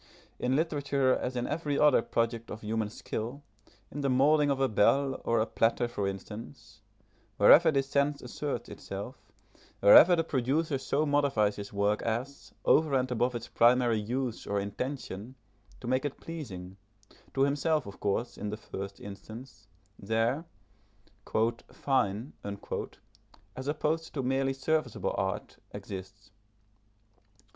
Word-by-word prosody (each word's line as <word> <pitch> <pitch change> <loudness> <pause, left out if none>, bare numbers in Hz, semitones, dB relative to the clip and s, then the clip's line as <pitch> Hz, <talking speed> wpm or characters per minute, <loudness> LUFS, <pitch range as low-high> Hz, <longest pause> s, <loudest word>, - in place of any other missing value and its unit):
In 125 +1 +1
literature, 140 -4 +1
as 125 - -3
in 120 0 -1
every 150 -2 -2
other 150 -5 +5
product 115 0 -1
of 110 - -7
human 110 0 -2
skill, 120 +6 -5 0.5
in 145 - -5
the 140 - +1
moulding 145 +3 +4
of 135 -1 +1
a 135 - +3
bell 135 +5 +2
or 115 -1 +2
a 110 - +2
platter 115 +1 +1
for 105 -4 -2
instance, 105 +2 -8 0.6
wherever 160 +11 +8
this 135 -3 +1
sense 140 +1 +1
asserts 140 +4 -4
itself, - - -8 0.5
wherever 160 - +8
the 165 - +1
producer 140 +1 0
so 140 +3 0
modifies 140 -8 +2
his 100 -1 -7
work 100 +1 +1
as, 120 +5 -4
over 155 -3 +4
and 130 -1 +1
above 125 +1 +1
its 120 0 -5
primary 120 -1 +4
use 120 +2 -3
or 100 0 0
intention, 110 +2 -5 0.5
to - - -9
make 130 +2 +1
it 145 -2 -4
pleasing 95 - -7 0.6
(to 135 - +1
himself, 145 +1 +1
of 100 - -10
course, 115 +4 -2
in 105 - -3
the 105 - -4
first 100 -2 -7
instance) 105 +2 -10 0.3
there, 115 - 0 1.3
"fine" 120 -2 0 1.2
as 130 +1 -6
opposed 155 +2 -1
to 135 - -1
merely 135 +1 +1
serviceable 135 -2 -1
art, - - -3
exists. 95 +2 -9
125 Hz, 135 wpm, -30 LUFS, 110-140 Hz, 1.3 s, wherever